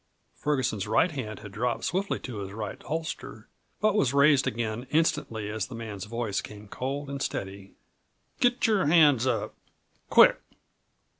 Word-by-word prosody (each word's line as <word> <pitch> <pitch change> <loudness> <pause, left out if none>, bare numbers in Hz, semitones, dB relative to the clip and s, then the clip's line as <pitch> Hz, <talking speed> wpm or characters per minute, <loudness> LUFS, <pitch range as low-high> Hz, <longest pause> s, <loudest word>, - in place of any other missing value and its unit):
Ferguson's 130 -9 -1
right 160 +11 +3
hand 110 -9 -6
had 105 -3 -9
dropped 120 +4 -2
swiftly 195 +3 -1
to 120 -4 -6
his 95 -1 -6
right 110 0 -6
holster, 160 +2 -5 0.3
but 215 0 +3
was 140 -10 +1
raised 140 -1 +5
again 115 +2 -3
instantly 150 -9 0
as 105 -1 -3
the 125 - -8
man's 105 -4 -6
voice 110 -2 -2
came 105 0 -11
cold 135 +6 -4
and 140 0 -5
steady: 95 -3 -5 0.6
"Get 245 0 +2
your 210 -8 +2
hands 145 -6 +5
up 130 - -1 0.6
quick!" - - +6
125 Hz, 150 wpm, -27 LUFS, 105-150 Hz, 0.6 s, quick